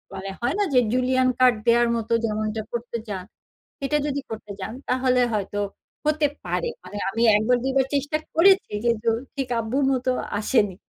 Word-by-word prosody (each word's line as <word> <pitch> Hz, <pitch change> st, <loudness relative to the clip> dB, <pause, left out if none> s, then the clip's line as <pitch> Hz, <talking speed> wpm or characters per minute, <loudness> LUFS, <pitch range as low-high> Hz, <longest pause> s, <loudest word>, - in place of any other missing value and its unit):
মানে 195 Hz, +1 st, -5 dB
হয় 245 Hz, +8 st, 0 dB
না? -, -, +4 dB
যে 250 Hz, -, +6 dB
julienne 255 Hz, 0 st, +2 dB
cut 250 Hz, -2 st, +6 dB
দেয়ার 235 Hz, 0 st, +5 dB
মতো 230 Hz, 0 st, -2 dB
যেমনটা 215 Hz, 0 st, -2 dB
করতে 235 Hz, 0 st, -3 dB
চান, 190 Hz, -2 st, -4 dB, 0.6 s
সেটা 280 Hz, +2 st, 0 dB
যদি 285 Hz, 0 st, -1 dB
করতে 215 Hz, -2 st, -7 dB
যান 215 Hz, +4 st, -4 dB, 0.2 s
তাহলে 255 Hz, 0 st, +2 dB
হয়তো 205 Hz, 0 st, -2 dB, 0.5 s
হতে 305 Hz, -1 st, +3 dB, 0.2 s
পারে। 485 Hz, -, -1 dB
মানে 205 Hz, -, -8 dB
আমি 230 Hz, +3 st, 0 dB
একবার, 245 Hz, +4 st, +2 dB
দুইবার 265 Hz, 0 st, +2 dB
চেষ্টা 290 Hz, +2 st, 0 dB, 0.2 s
করেছি 380 Hz, +3 st, +5 dB
যে 235 Hz, -, +5 dB
দু 230 Hz, -, +3 dB, 0.2 s
ঠিক 270 Hz, -2 st, -3 dB
আব্বুর 250 Hz, +5 st, 0 dB
মতো 255 Hz, 0 st, 0 dB, 0.3 s
আসেনি। 210 Hz, -3 st, +2 dB
250 Hz, 170 wpm, -24 LUFS, 220-270 Hz, 0.6 s, যে